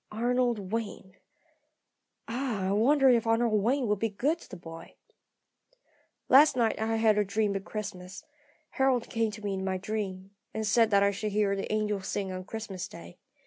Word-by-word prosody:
Arnold 235 -3 0
Wayne 205 -4 -4 1.1
ah, 225 -6 -2
I - - 0
wonder 270 +7 +4
if 235 -2 +2
Arnold 225 -2 +2
Wayne 255 +5 +1
will 210 -2 +1
be 225 +3 -1
good 285 +11 -1
to - - -15
the 190 - -8
boy? 165 -1 -11 1.3
"Last 280 +1 +6
night 225 -2 +1
I 225 0 0
had 220 -2 +3
a - - +3
dream 205 0 -1
of 195 0 -4
Christmas. 190 -3 -7 0.5
Harold 265 -3 +1
came 225 -1 +1
to 210 0 -10
me 200 - -1
in 190 0 -3
my 190 -1 -1
dream, 195 -1 -5 0.2
and 220 0 -2
said 225 +2 +3
that 200 -1 +4
I 200 - +3
should 205 +1 -4
hear 205 -1 +2
the 195 - -4
angels 210 -2 -1
sing 195 -2 -3
on 185 0 -6
Christmas 210 -4 -6
day. 85 +1 -12
215 Hz, 185 wpm, -29 LUFS, 195-230 Hz, 1.3 s, Last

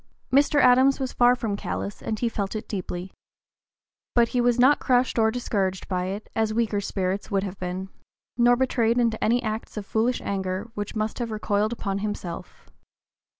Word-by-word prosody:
Mr. 290 +2 +4
Adams 260 +1 +5
was 260 -2 -3
far 245 0 +5
from 225 -4 -2
callous 200 0 -4
and 220 - -3
he 240 - 0
felt 205 -2 -3
it 215 - -5
deeply. 185 -2 -5 1.0
But 235 -1 +4
he 250 - +1
was 240 0 +3
not 265 +4 +5
crushed 250 -1 +2
or 220 0 +4
discouraged 200 -5 -2
by 180 -1 -1
it, 195 +3 -5
as 220 -1 0
weaker 220 -3 +1
spirits 195 0 -2
would 195 -2 0
have 195 -1 -6
been, 185 +1 -4 0.5
nor 240 0 +5
betrayed 240 -2 +1
into 230 -2 +1
any 240 +3 +2
acts 220 0 -4
of 205 - -4
foolish 230 +5 0
anger 190 +2 -3
which 205 -1 -5
must 215 +2 -2
have 235 -1 -2
recoiled 210 0 0
upon 200 -4 -3
himself. 200 -4 -6
220 Hz, 180 wpm, -25 LUFS, 200-245 Hz, 1.0 s, Adams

